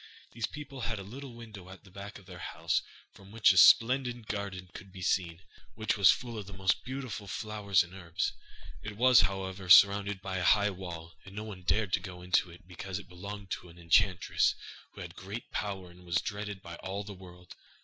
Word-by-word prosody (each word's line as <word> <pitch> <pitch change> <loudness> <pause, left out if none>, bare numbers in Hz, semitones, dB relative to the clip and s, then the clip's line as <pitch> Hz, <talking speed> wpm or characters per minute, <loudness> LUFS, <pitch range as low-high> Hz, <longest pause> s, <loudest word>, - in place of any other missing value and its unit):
These 115 -2 -3
people 145 -3 -8
had 110 0 -2
a 100 - -6
little 125 +5 -9
window 110 -6 -11
at 95 - -12
the 95 - -17
back 100 +2 -8
of 100 - -16
their 90 -2 -11
house - - -1 0.3
from 95 0 -16
which 115 0 +5
a 95 - 0
splendid 120 +1 +5
garden 100 -3 -4
could 95 - -11
be 90 -1 -9
seen, 85 -1 0 0.3
which 110 0 0
was 100 -2 +6
full 120 -3 +1
of 100 - -8
the 100 - -9
most 95 0 +1
beautiful 130 -5 -5
flowers 105 -1 +1
and 90 +1 -13
herbs. 85 -2 -2 0.5
It 105 +2 -7
was, 125 +1 +7
however, 95 -1 -3
surrounded 100 +2 +7
by 95 0 -4
a 90 - -1
high 105 +2 +4
wall, 85 -3 -8
and 95 0 -13
no 105 - -4
one 105 -4 -8
dared 90 +3 0
to - - +4
go 90 -2 -9
into 90 0 +2
it 85 +1 -15
because 90 +1 -6
it 100 - -10
belonged 100 +2 -8
to 90 - -5
an 85 - -15
enchantress, 85 +2 +3 0.4
who - - -10
had 85 -1 -7
great 100 +5 -7
power 95 -3 -4
and 90 +1 -17
was 85 -1 -4
dreaded 100 -1 -5
by 85 0 -8
all 100 +2 -5
the 100 0 -8
world. 90 -1 -13
95 Hz, 210 wpm, -31 LUFS, 90-105 Hz, 0.5 s, was